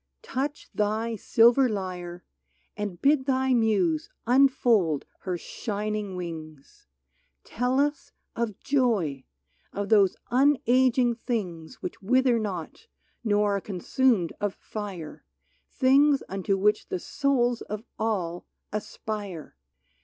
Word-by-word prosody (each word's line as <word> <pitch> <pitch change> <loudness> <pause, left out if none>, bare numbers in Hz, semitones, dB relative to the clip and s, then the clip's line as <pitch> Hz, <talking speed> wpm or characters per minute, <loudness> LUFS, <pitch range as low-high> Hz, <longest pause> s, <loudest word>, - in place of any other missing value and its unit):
Touch 280 +3 -3
thy 220 +2 0
silver 235 +5 +4
lyre 180 -4 -5 0.5
And 205 -4 -4
bid 280 -1 +3
thy 265 -1 +2
Muse 200 -9 +2 0.2
unfold 240 - +3
her 180 -2 -3
shining 210 +1 -4
wings! 155 - -8 0.6
Tell 250 +3 0
us 290 0 0 0.2
of 230 -4 -2
joy 210 - 0 0.2
— - - -40
of 205 0 -4
those 200 -4 +5 0.2
unaging 255 -2 +3
things 185 -9 -4
Which - - -6
wither 250 +3 +3
not, 200 - -5 0.4
nor 205 -2 +2
are - - -5
consumed 200 0 +1
of 205 -1 -1
fire, 195 -7 -7 0.5
Things 275 +2 +4
unto 195 0 -1
which 210 +2 +2
the - - -1
souls 245 +2 0
of 210 +1 -6 0.2
all 185 -6 -2 0.3
aspire 205 - -5
215 Hz, 110 wpm, -27 LUFS, 185-250 Hz, 0.6 s, those